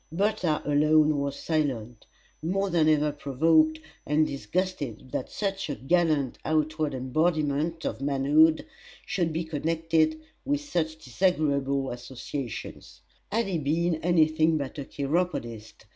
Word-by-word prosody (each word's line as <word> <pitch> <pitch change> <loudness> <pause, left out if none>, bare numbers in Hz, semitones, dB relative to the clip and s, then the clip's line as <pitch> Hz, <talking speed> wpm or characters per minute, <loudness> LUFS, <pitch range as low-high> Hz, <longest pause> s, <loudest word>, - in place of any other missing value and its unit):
Bertha 180 -3 0
alone 150 0 +4
was 140 0 -2
silent, 125 -8 -2 0.3
more 195 +4 -1
than 160 -2 +3
ever 150 -1 +3
provoked 155 +3 +2 0.3
and 150 +1 +2
disgusted 140 - -3
that 130 - -3
such 195 -3 -3
a 145 - -2
gallant 155 -3 +1
outward 155 -1 0
embodiment 155 +3 0
of - - -3
manhood 145 +3 +3 0.4
should 170 -4 -1
be 165 +2 -2
connected 160 0 0 0.2
with 290 +1 0
such 165 - -2
disagreeable 140 -3 +1
associations! 125 0 -7 0.3
Had 230 +2 +1
he 185 -4 -1
been 165 +3 0
any 165 -1 +3
thing 155 0 +2
but 140 0 -5
a 140 - -5
chiropodist! 135 -8 -3
155 Hz, 125 wpm, -27 LUFS, 140-165 Hz, 0.4 s, alone